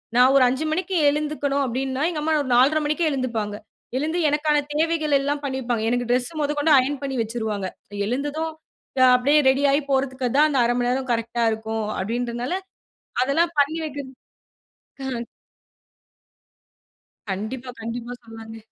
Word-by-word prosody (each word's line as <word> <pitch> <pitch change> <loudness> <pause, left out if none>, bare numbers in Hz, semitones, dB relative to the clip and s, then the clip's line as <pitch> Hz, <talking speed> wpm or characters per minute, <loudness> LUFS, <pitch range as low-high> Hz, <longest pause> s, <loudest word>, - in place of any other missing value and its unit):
"நான் 250 +2 +6
ஒரு 265 - +6
5:00 265 +5 -1
மணிக்கு 370 +3 -1
எழுந்துக்கணும்." 290 -1 -1
அப்பிடீன்னா 260 +3 -2
எங்க 305 -3 -3
அம்மா 320 - +1
ஒரு 260 - -6
4:30 285 +5 +4
மணிக்கே 310 +2 +1
எழுந்துப்பாங்க. 230 -6 -2 0.4
எழுந்து 315 +5 -1
எனக்கான 295 0 +2
தேவைகளெல்லாம் 295 -3 +1
பண்ணி 265 -1 -2
வப்பாங்க. 235 -3 -1
எனக்கு 245 0 0
டிரெஸ் 245 +5 +1
முதக்கொண்டு 295 +1 +2
அயர்ன் 275 +2 +1
பண்ணி 270 -2 -3
வச்சுருவாங்க. 220 -4 -3 0.4
"எழுந்ததும் 290 +6 -2 0.5
நான் 255 -1 +7
அப்பிடியே 285 +5 +4
ரெடி 270 +2 +2
ஆயிப் 285 0 0
போறதுக்கு 265 -1 0
தான் 305 - +6
அந்த 275 -3 +1
0:30 240 - +1
மணி 245 - +1
நேரம் 260 0 -1
கரெக்ட்டா 235 +1 -1
இருக்கும்." 220 0 -3
அப்பிடீன்றனால, 240 - -2 0.7
அதெல்லாம் 325 +6 +1
பண்ணி 295 +3 +2
வைக்கி 285 -1 -5 1.2
ம். 235 - -5 2.0
கண்டிப்பா, 240 +6 -4
கண்டிப்பா. 235 +2 -5
சொல்லாங்க! 225 0 -10
265 Hz, 140 wpm, -23 LUFS, 240-295 Hz, 2.0 s, நான்